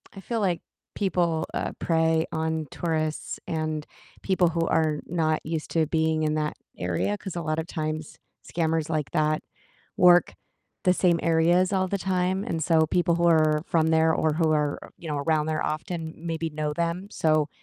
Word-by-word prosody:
I -, -, -8 dB
feel 230 Hz, +3 st, -2 dB
like 180 Hz, -4 st, 0 dB, 0.3 s
people, 175 Hz, -5 st, 0 dB
uh, -, -, -2 dB
prey 160 Hz, -1 st, +2 dB
on 160 Hz, -1 st, -1 dB
tourists 155 Hz, -2 st, -2 dB
and 155 Hz, -1 st, -2 dB, 0.4 s
people 185 Hz, -3 st, +2 dB
who 165 Hz, 0 st, -1 dB
are 155 Hz, -2 st, +1 dB
not 160 Hz, -2 st, 0 dB
used 160 Hz, -1 st, -4 dB
to 160 Hz, -2 st, +2 dB
being 160 Hz, 0 st, +1 dB
in 155 Hz, 0 st, +1 dB
that 150 Hz, -1 st, -1 dB, 0.2 s
area, 90 Hz, -, -1 dB
'cause 190 Hz, -3 st, -7 dB
a 170 Hz, -, -2 dB
lotta 155 Hz, 0 st, -1 dB
times 155 Hz, -1 st, -4 dB, 0.3 s
scammers 160 Hz, -2 st, 0 dB
like 155 Hz, -3 st, -2 dB
that 155 Hz, -1 st, +1 dB, 0.5 s
work 175 Hz, 0 st, +5 dB, 0.5 s
the 180 Hz, -, +5 dB
same 175 Hz, -2 st, +3 dB
areas 170 Hz, +3 st, +3 dB
all 190 Hz, -1 st, +1 dB
the 200 Hz, -, -1 dB
time, 185 Hz, +1 st, 0 dB
and 165 Hz, -8 st, -2 dB
so 160 Hz, -2 st, +4 dB
people 170 Hz, 0 st, +2 dB
who 170 Hz, 0 st, +2 dB
are 155 Hz, -2 st, +4 dB
from 160 Hz, -1 st, +2 dB
there 160 Hz, 0 st, +4 dB
or 155 Hz, -1 st, +1 dB
who 160 Hz, -1 st, +2 dB
are, 150 Hz, -1 st, +1 dB, 0.2 s
you 165 Hz, -, -9 dB
know, 145 Hz, -1 st, -1 dB
around 155 Hz, +1 st, +1 dB
there 155 Hz, -1 st, -1 dB
often 160 Hz, +1 st, -4 dB
maybe 165 Hz, 0 st, -3 dB
know 150 Hz, 0 st, -2 dB
them, 170 Hz, +4 st, -2 dB
so, 155 Hz, -4 st, +2 dB
160 Hz, 175 wpm, -26 LUFS, 155-175 Hz, 0.5 s, work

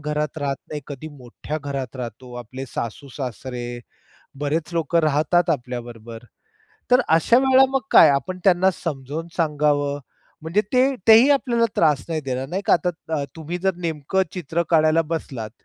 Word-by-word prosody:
घरात 150 Hz, 0 st, -3 dB
राहत 140 Hz, -2 st, -2 dB
नाही, 150 Hz, -, -4 dB
कधी 145 Hz, +2 st, -7 dB
मोठ्या 145 Hz, +2 st, -7 dB
घरात 140 Hz, -2 st, -5 dB
राहतो. 125 Hz, 0 st, -8 dB
आपले 125 Hz, +2 st, -7 dB
सासू-सासरे, 125 Hz, -1 st, -6 dB, 0.6 s
बरेच 155 Hz, +3 st, -2 dB
लोक 165 Hz, 0 st, 0 dB
राहतात 160 Hz, +3 st, +2 dB
आपल्याबरोबर, 120 Hz, -4 st, -5 dB, 0.7 s
तर 250 Hz, +1 st, +6 dB
अशा 165 Hz, +8 st, +4 dB
वेळेला 265 Hz, 0 st, +5 dB
मग 270 Hz, 0 st, +1 dB
काय? -, -, +8 dB
आपण 140 Hz, +7 st, -1 dB
त्यांना 190 Hz, 0 st, +4 dB
समजून 150 Hz, +1 st, -5 dB
सांगावं? 145 Hz, -3 st, +1 dB, 0.4 s
म्हणजे 165 Hz, +6 st, +1 dB
ते 250 Hz, -, +4 dB, 0.3 s
तेही 225 Hz, +5 st, +8 dB
आपल्याला 245 Hz, -4 st, +2 dB
त्रास 150 Hz, -5 st, +3 dB
नाही 160 Hz, -2 st, -2 dB
देणार 130 Hz, -1 st, -3 dB
नाही 190 Hz, +6 st, -3 dB
का. -, -, +4 dB
आता 160 Hz, -4 st, -1 dB
तुम्ही 160 Hz, +2 st, -5 dB
जर 190 Hz, +1 st, 0 dB
नेमकं 170 Hz, +1 st, -1 dB
चित्र 170 Hz, -1 st, -2 dB
काढायला 160 Hz, 0 st, +4 dB
बसलात 130 Hz, -9 st, -4 dB
150 Hz, 145 wpm, -22 LUFS, 135-170 Hz, 0.7 s, काय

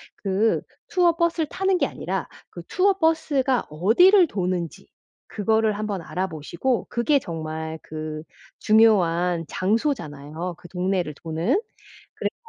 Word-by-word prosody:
그 200 Hz, +3 st, +1 dB, 0.3 s
투어 350 Hz, -2 st, +3 dB
버스를 335 Hz, -2 st, +1 dB
타는 385 Hz, -1 st, +1 dB
게 -, -, +2 dB
아니라 -, -, -4 dB, 0.2 s
그 -, -, -9 dB
투어 390 Hz, +2 st, +3 dB
버스가 305 Hz, -7 st, +1 dB
어디를 335 Hz, -, +5 dB
도는지 180 Hz, -, -3 dB, 0.4 s
그거를 220 Hz, +1 st, +1 dB
한번 205 Hz, -4 st, -3 dB
알아보시고 180 Hz, -, -2 dB
그게 275 Hz, +4 st, +2 dB
정말 160 Hz, -3 st, -5 dB
그 155 Hz, 0 st, -6 dB, 0.4 s
중요한 180 Hz, -6 st, +3 dB
장소잖아요, 180 Hz, -, -2 dB
그 175 Hz, -, -14 dB
동네를 180 Hz, -4 st, -1 dB
도는? 165 Hz, -, 0 dB, 0.6 s
그래서 -, -, -3 dB
195 Hz, 270 characters per minute, -24 LUFS, 165-270 Hz, 0.6 s, 어디를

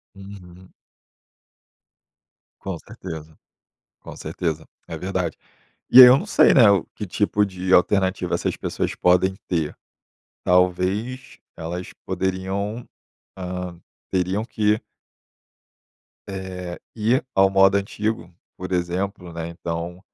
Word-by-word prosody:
Uhum. 95 Hz, -2 st, -13 dB, 1.9 s
Com 95 Hz, -3 st, -5 dB
certeza, 80 Hz, -7 st, -9 dB, 0.7 s
com -, -, -10 dB
certeza, 80 Hz, -2 st, -4 dB, 0.2 s
é 80 Hz, -, -6 dB
verdade. 90 Hz, -2 st, -3 dB, 0.5 s
E 130 Hz, -, +10 dB
aí 125 Hz, -, +13 dB
eu 130 Hz, +2 st, +7 dB
não 195 Hz, -, -6 dB
sei, -, -, +5 dB
né, 115 Hz, -7 st, +7 dB
o 100 Hz, -4 st, +3 dB
que 105 Hz, -, -5 dB
tipo 105 Hz, +2 st, +1 dB
de 95 Hz, -1 st, -3 dB
alternativa 95 Hz, -1 st, +2 dB
essas -, -, -1 dB
pessoas -, -, -3 dB
podem 90 Hz, +1 st, +3 dB
ter, 80 Hz, -4 st, -1 dB, 0.7 s
talvez 90 Hz, +8 st, 0 dB, 0.2 s
elas 85 Hz, +3 st, -6 dB
poderiam, 95 Hz, +4 st, -2 dB, 0.5 s
hã, 90 Hz, -1 st, -5 dB, 0.3 s
teriam 95 Hz, +3 st, 0 dB
que 105 Hz, -2 st, +1 dB, 1.5 s
Eh, 95 Hz, -2 st, -6 dB, 0.2 s
e 115 Hz, +6 st, +1 dB
ao 95 Hz, 0 st, +5 dB
modo 95 Hz, 0 st, +5 dB
antigo, 100 Hz, -2 st, -3 dB, 0.2 s
por 90 Hz, 0 st, -7 dB
exemplo, 90 Hz, +1 st, -2 dB
né, 85 Hz, 0 st, -5 dB
então 85 Hz, +1 st, -5 dB
95 Hz, 110 wpm, -23 LUFS, 90-100 Hz, 1.9 s, aí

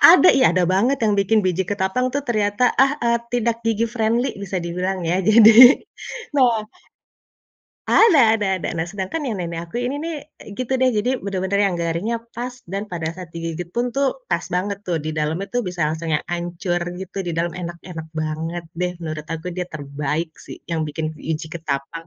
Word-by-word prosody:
ada, 360 Hz, +1 st, +7 dB
ih 265 Hz, -, +4 dB
ada 180 Hz, 0 st, +2 dB
banget 230 Hz, +10 st, +2 dB
yang 205 Hz, -, +3 dB
bikin 200 Hz, +2 st, +3 dB
biji 185 Hz, +1 st, +1 dB
ketapang 205 Hz, +7 st, -1 dB
tuh 285 Hz, +1 st, -3 dB
ternyata 215 Hz, +1 st, +1 dB
ah 270 Hz, +3 st, +3 dB
eee, 235 Hz, 0 st, +3 dB
tidak 235 Hz, -1 st, 0 dB
gigi 225 Hz, 0 st, +1 dB
friendly 230 Hz, +2 st, 0 dB
bisa 190 Hz, -1 st, -3 dB
dibilang 180 Hz, +2 st, -2 dB
ya, 180 Hz, +3 st, +1 dB
jadi 225 Hz, +5 st, +9 dB, 0.6 s
nah 235 Hz, -5 st, +3 dB, 1.3 s
ada 385 Hz, -11 st, +6 dB, 0.2 s
ada 205 Hz, -, -1 dB
ada, -, -, -3 dB
nah 165 Hz, -, 0 dB
sedangkan 200 Hz, +11 st, -4 dB
yang 220 Hz, -5 st, -2 dB
nenek 170 Hz, -1 st, -4 dB
aku -, -, -5 dB
ini 260 Hz, +3 st, -2 dB
nih, 335 Hz, -1 st, -3 dB, 0.3 s
e -, -, -16 dB
gitu 255 Hz, +1 st, -2 dB
deh, 260 Hz, -1 st, +4 dB
jadi 245 Hz, +5 st, +1 dB
bener-bener 195 Hz, 0 st, -1 dB
yang 185 Hz, -, 0 dB
garingnya 170 Hz, +8 st, -1 dB, 0.2 s
pas 245 Hz, +2 st, -4 dB, 0.2 s
dan 200 Hz, +1 st, -2 dB
pada 165 Hz, -2 st, -2 dB
saat 180 Hz, -3 st, -9 dB
digigit 165 Hz, +1 st, -4 dB
pun 240 Hz, +1 st, 0 dB
tuh 280 Hz, -, +1 dB
pas -, -, 0 dB
banget 200 Hz, +2 st, -1 dB
tuh 170 Hz, -2 st, 0 dB
di 155 Hz, -, -2 dB
dalamnya 160 Hz, +6 st, -1 dB
tuh 245 Hz, -, +2 dB
bisa 180 Hz, -1 st, -6 dB
langsung 160 Hz, +1 st, -3 dB
yang -, -, 0 dB
hancur 175 Hz, +1 st, -2 dB, 0.2 s
gitu, 190 Hz, +1 st, -7 dB
di 170 Hz, -, -2 dB
dalam 170 Hz, 0 st, 0 dB
enak-enak 170 Hz, -1 st, -7 dB
banget 160 Hz, +2 st, -3 dB, 0.2 s
deh, 180 Hz, 0 st, 0 dB
menurut 155 Hz, -1 st, -5 dB
aku 165 Hz, +2 st, -6 dB
dia 180 Hz, -, -1 dB
terbaik 150 Hz, +2 st, -3 dB
sih -, -, -10 dB
yang 160 Hz, -1 st, 0 dB
bikin 155 Hz, +1 st, -3 dB
biji 155 Hz, 0 st, -4 dB
ketapang. 160 Hz, +1 st, -4 dB
190 Hz, 190 wpm, -21 LUFS, 165-235 Hz, 1.3 s, jadi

